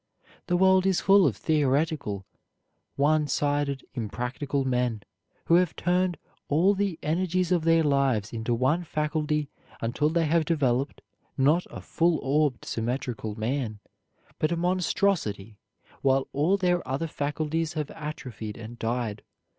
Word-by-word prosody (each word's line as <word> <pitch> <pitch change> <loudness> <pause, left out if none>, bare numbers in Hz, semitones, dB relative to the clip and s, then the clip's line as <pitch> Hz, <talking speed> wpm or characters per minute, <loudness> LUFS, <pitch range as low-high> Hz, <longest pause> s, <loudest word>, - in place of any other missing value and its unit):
The 175 - +2
world 190 0 +4
is 190 -2 +2
full 195 -3 +5
of 110 -7 -1
theoretical, 145 - 0 0.7
one 150 +1 +2
sided, 145 -2 0
impractical 125 +4 -3
men, 125 -4 0 0.4
who - - +2
have 180 -3 +1
turned 180 0 +1 0.3
all 170 +7 +4
the 195 -4 -1
energies 180 +3 0
of 170 -3 +2
their 165 0 +4
lives 135 -8 +1
into 115 +1 -1
one 135 +9 +1
faculty 150 -2 -1 0.3
until 125 +6 0
they 165 0 +1
have 160 +1 +2
developed, 140 -4 0 0.3
not 150 +6 +3
a - - -8
full 170 -1 +1
orbed, 140 -1 +1
symmetrical 115 -2 -3
man, 115 -1 -2 0.6
but 155 - +1
a 170 - 0
monstrosity, 170 - 0 0.4
while 135 0 +2
all 160 +8 +2
their 180 -2 +1
other 135 +5 -1
faculties 155 +2 -2
have 150 -2 -3
atrophied 130 -9 -7
and 115 +1 -9
died. 115 -2 -2
150 Hz, 135 wpm, -27 LUFS, 125-165 Hz, 0.7 s, full